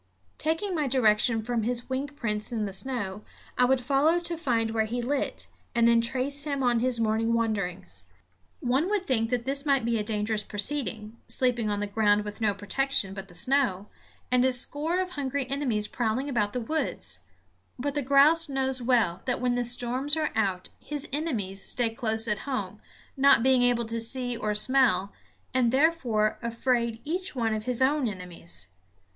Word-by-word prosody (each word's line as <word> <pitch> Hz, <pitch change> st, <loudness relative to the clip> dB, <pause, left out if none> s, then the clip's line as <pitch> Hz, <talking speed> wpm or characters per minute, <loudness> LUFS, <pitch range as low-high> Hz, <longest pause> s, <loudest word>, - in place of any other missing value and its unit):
Taking 325 Hz, +6 st, 0 dB
my 305 Hz, -4 st, 0 dB
direction 225 Hz, -2 st, +2 dB
from 240 Hz, 0 st, -1 dB
his 240 Hz, +2 st, -2 dB
wing 265 Hz, +2 st, -2 dB
prints 225 Hz, -7 st, -3 dB
in 220 Hz, -3 st, -1 dB
the 195 Hz, -, -5 dB
snow, 210 Hz, -3 st, -3 dB, 0.3 s
I 250 Hz, -, +4 dB
would 265 Hz, +1 st, +3 dB
follow 280 Hz, +7 st, +2 dB
to 345 Hz, 0 st, -3 dB
find 235 Hz, -9 st, 0 dB
where 220 Hz, -1 st, +1 dB
he 235 Hz, +3 st, -3 dB
lit, 270 Hz, +4 st, -2 dB, 0.3 s
and 235 Hz, 0 st, +4 dB
then 235 Hz, 0 st, +5 dB
trace 265 Hz, +4 st, -1 dB
him 280 Hz, -2 st, -2 dB
on 240 Hz, -2 st, +2 dB
his 250 Hz, 0 st, 0 dB
morning 225 Hz, +1 st, +1 dB
wanderings. 195 Hz, -, -2 dB, 0.6 s
One 265 Hz, +8 st, +1 dB
would 410 Hz, -3 st, 0 dB
think 225 Hz, -6 st, +1 dB
that 245 Hz, -1 st, -1 dB
this 275 Hz, +1 st, -1 dB
might 275 Hz, -5 st, +2 dB
be 230 Hz, -1 st, +1 dB
a -, -, -1 dB
dangerous 210 Hz, 0 st, -1 dB
proceeding, 220 Hz, -1 st, -2 dB
sleeping 240 Hz, -4 st, 0 dB
on 205 Hz, 0 st, -1 dB
the -, -, 0 dB
ground 205 Hz, 0 st, +2 dB
with 210 Hz, +2 st, -7 dB
no 205 Hz, -2 st, +2 dB
protection 205 Hz, 0 st, 0 dB
but 195 Hz, 0 st, -8 dB
the 175 Hz, -, -15 dB
snow, 240 Hz, -6 st, +1 dB, 0.4 s
and 250 Hz, 0 st, +4 dB
a 260 Hz, -, +3 dB
score 295 Hz, +7 st, -1 dB
of 365 Hz, -1 st, -4 dB
hungry 280 Hz, -3 st, -2 dB
enemies 245 Hz, -7 st, 0 dB
prowling 240 Hz, +3 st, -2 dB
about 210 Hz, -7 st, 0 dB
the 250 Hz, -, -1 dB
woods; 315 Hz, +8 st, -3 dB, 0.6 s
but 280 Hz, +3 st, -2 dB
the 290 Hz, -, 0 dB
grouse 285 Hz, +4 st, +4 dB
knows 265 Hz, -1 st, -1 dB
well 230 Hz, -8 st, +1 dB
that 250 Hz, -2 st, 0 dB
when 250 Hz, 0 st, +1 dB
the 245 Hz, 0 st, 0 dB
storms 245 Hz, +5 st, -1 dB
are 310 Hz, -, 0 dB
out 195 Hz, -4 st, -1 dB
his 295 Hz, -1 st, -5 dB
enemies 215 Hz, -, -1 dB
stay 235 Hz, +1 st, +1 dB
close 225 Hz, -1 st, +2 dB
at 210 Hz, -1 st, 0 dB
home, 260 Hz, -, -4 dB, 0.3 s
not 275 Hz, -4 st, +5 dB
being 260 Hz, -1 st, +4 dB
able 245 Hz, -1 st, +2 dB
to 230 Hz, +1 st, -2 dB
see 245 Hz, +1 st, 0 dB
or 210 Hz, -2 st, -2 dB
smell, 210 Hz, -5 st, +4 dB, 0.4 s
and 250 Hz, -2 st, +2 dB
therefore 260 Hz, -7 st, +1 dB
afraid 235 Hz, -1 st, -1 dB
each 360 Hz, +2 st, -3 dB
one 225 Hz, -3 st, 0 dB
of 215 Hz, 0 st, -4 dB
his 250 Hz, 0 st, +2 dB
own 280 Hz, -1 st, +2 dB
enemies. 175 Hz, -, -4 dB
245 Hz, 185 wpm, -27 LUFS, 215-275 Hz, 0.6 s, then